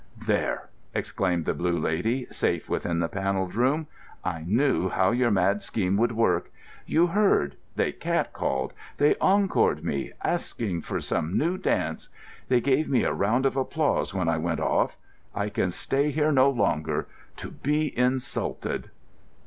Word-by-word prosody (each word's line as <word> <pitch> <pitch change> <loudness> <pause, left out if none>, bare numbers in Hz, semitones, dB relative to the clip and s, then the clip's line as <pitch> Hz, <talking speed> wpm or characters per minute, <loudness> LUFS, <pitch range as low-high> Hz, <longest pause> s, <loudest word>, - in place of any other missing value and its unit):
"There!" - - 0 0.3
exclaimed 90 -4 -1
the - - +1
Blue 85 0 0
Lady, 100 +11 0
safe - - -1
within 85 -1 -1
the 85 - +1
Panelled 95 0 -2
Room, 135 +7 +1 0.4
"I 80 -1 -3
knew 115 -3 +2
how 95 0 +2
your 120 0 +2
mad 100 0 +2
scheme 95 -3 -1
would 120 +2 +2
work. 115 0 +1 0.4
You 165 +2 +4
heard: 175 - +2 0.2
they - - +1
catcalled, - - -1 0.2
they 145 +1 +5
encored 195 0 +3
me, 70 -1 -3
asked - - -2 0.2
for - - -3
some 80 +4 -1
new 170 +4 +1
dance. 80 - -1 0.4
They 125 -1 +3
gave 140 +4 +2
me 135 - +3
a - - +1
round 115 +7 +1
of 135 - +2
applause 140 0 0
when 95 -4 -1
I 80 -1 +1
went - - -1
off. - - +1 0.4
I 100 +1 -1
can 95 - 0
stay 140 +10 0
here 150 +1 +1
no 135 -1 +5
longer, 80 - 0 0.3
to - - -7
be 150 +2 -1
insulted." 125 +1 -1
115 Hz, 155 wpm, -26 LUFS, 90-140 Hz, 0.4 s, they